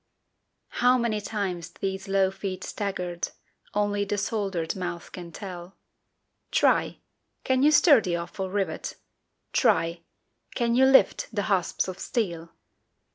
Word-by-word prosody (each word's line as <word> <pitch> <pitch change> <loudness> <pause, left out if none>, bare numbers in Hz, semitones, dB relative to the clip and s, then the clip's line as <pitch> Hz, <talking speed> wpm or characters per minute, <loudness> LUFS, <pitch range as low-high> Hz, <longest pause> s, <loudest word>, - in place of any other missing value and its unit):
How 250 +1 +6
many 230 -3 0
times 190 -5 -3
these 190 0 -4
low 195 -1 +2
feet 190 -1 -5
staggered, 180 -4 -3 0.5
Only 205 0 +1
the 205 +1 -2
soldered 195 -5 -2
mouth 175 -2 -5
can 175 -2 -8
tell; 180 0 -8 0.7
Try! - - +2 0.5
can 260 -1 +2
you 295 - +6
stir 300 -4 +6
the 175 -4 -1
awful 175 +3 -4
rivet? 190 -5 -2 0.6
Try! 170 +1 +2 0.5
can 235 -2 +1
you 260 +2 +5
lift 265 0 +5
the 205 -3 -1
hasps 190 -4 0
of 185 0 -6
steel? 170 -9 -2
195 Hz, 130 wpm, -26 LUFS, 175-215 Hz, 0.7 s, How